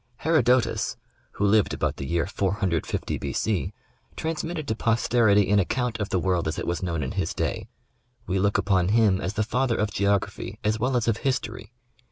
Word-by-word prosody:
Herodotus, 130 -7 +2 0.4
who 105 - -1
lived 105 +1 +3
about - - -1
the 70 - -5
year 85 +1 0
450 95 -3 -1
B. - - -3
C, - - -1 0.4
transmitted 160 -1 -3
to 110 - 0
posterity 115 -3 +3
an 105 - +5
account 120 +3 -1
of 105 0 -2
the - - +1
world 90 -2 0
as 80 - -2
it - - -3
was 85 0 -2
known 85 -5 -2
in 65 - -3
his - - -2
day. - - -2 0.6
We 95 0 -1
look 100 +1 +2
upon 95 -3 +2
him 105 -2 +3
as 95 +4 -2
the 110 - +1
father 125 +2 0
of 105 0 0
geography 100 +1 -1
as 110 +1 +1
well 125 +2 +1
as 120 - -1
of 115 -2 +2
history. 120 -3 -3
105 Hz, 190 wpm, -25 LUFS, 95-120 Hz, 0.6 s, an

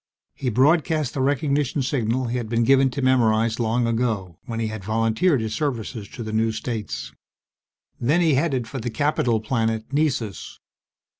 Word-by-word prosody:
He 130 - -2
broadcast 155 +3 +2
the 135 - -2
recognition 140 0 +1
signal 125 -1 0
he 120 +1 -2
had 115 -3 -4
been 115 0 +1
given 135 +2 +4
to 130 +2 -4
memorize 115 -3 +3
long 120 +1 +1
ago, 110 -7 -1
when 115 -1 -4
he 115 - 0
had 110 -2 -5
volunteered 115 - +1
his 110 -1 -3
services 115 -5 -3
to 120 - -7
the 110 0 -5
new 110 +1 +2
states. 100 - -5 0.9
Then 145 +8 +2
he 165 -4 +3
headed 135 -4 0
for 135 +3 -5
the 120 +1 -3
capital 125 -4 +1
planet, 110 +1 -2
Nessus. 135 -9 -1
120 Hz, 165 wpm, -23 LUFS, 110-135 Hz, 0.9 s, given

